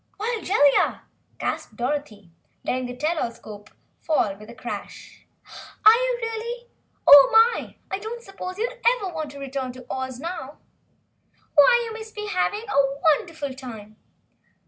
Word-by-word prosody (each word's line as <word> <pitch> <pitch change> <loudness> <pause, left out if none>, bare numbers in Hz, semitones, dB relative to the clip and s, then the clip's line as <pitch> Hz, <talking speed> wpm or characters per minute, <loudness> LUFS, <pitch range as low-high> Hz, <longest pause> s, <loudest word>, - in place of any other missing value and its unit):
"Why, 450 +3 -2
Jellia!" 290 -8 +3 0.3
gasped 220 - -4
Dorothy, 240 - -4 0.3
letting 255 0 -2
the 245 - -7
Tell 310 +5 -1
all - - -1
escope 210 -2 -12 0.3
fall 225 -11 0
with 210 +2 -14
a 235 - -11
crash, - - -8 0.6
"are 435 - +11
you, - - +1
really? 470 +1 -5 0.4
Oh 285 -1 +10
my! 450 +2 +3 0.2
I 385 - -2
don't 460 +3 -7
suppose 390 -2 -7
you'll 465 +4 -2 0.2
ever 390 -6 -5
want 310 -2 -4
to 280 0 -11
return 270 -1 -4
to 255 0 -12
Oz, 260 -1 -4
now. 300 -3 -6 1.0
Why, 480 - +6
you 450 - -6
must 440 0 -9
be 420 0 -5
having 410 +1 -1
a 280 -6 +1 0.2
wonderful 295 -5 -6
time!" 220 -5 -10
300 Hz, 150 wpm, -24 LUFS, -, 1.0 s, are